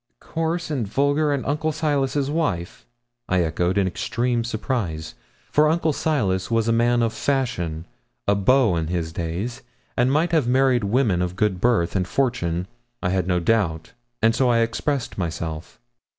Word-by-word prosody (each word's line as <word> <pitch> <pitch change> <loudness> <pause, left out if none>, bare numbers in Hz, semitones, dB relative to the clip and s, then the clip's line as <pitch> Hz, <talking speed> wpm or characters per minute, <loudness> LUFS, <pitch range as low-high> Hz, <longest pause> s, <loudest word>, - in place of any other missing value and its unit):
'Coarse 165 +1 -2
and 125 -8 -1
vulgar, 145 +6 +1
and 140 -2 -1
Uncle 155 +3 0
Silas's 145 -3 0
wife!' 145 - -2 0.4
I 90 -1 +3
echoed 85 +3 0
in 100 - +3
extreme 120 +6 -1
surprise, 105 -9 -3 0.4
for 150 +1 +4
Uncle 160 -1 +1
Silas 100 -13 0
was 115 -1 +1
a - - +3
man 120 +1 +3
of 115 -1 0
fashion 85 - -1 0.4
a 100 - +5
beau 105 +1 +3
in 80 -1 -1
his 80 -2 -2
day 85 +6 -2 0.5
and 125 +2 +2
might 160 +4 +2
have 155 -7 +2
married 130 -2 +3
women 105 -4 +2
of 90 0 -2
good 95 -2 0
birth 115 -8 +2
and 90 -2 0
fortune, 90 -9 0 0.4
I 90 - +1
had 90 -1 0
no 90 -1 +2
doubt, 85 -4 0 0.3
and 115 0 +5
so 130 +1 +2
I 115 -1 +3
expressed 120 +2 -2
myself. 80 -1 -4
115 Hz, 165 wpm, -23 LUFS, 90-135 Hz, 0.5 s, a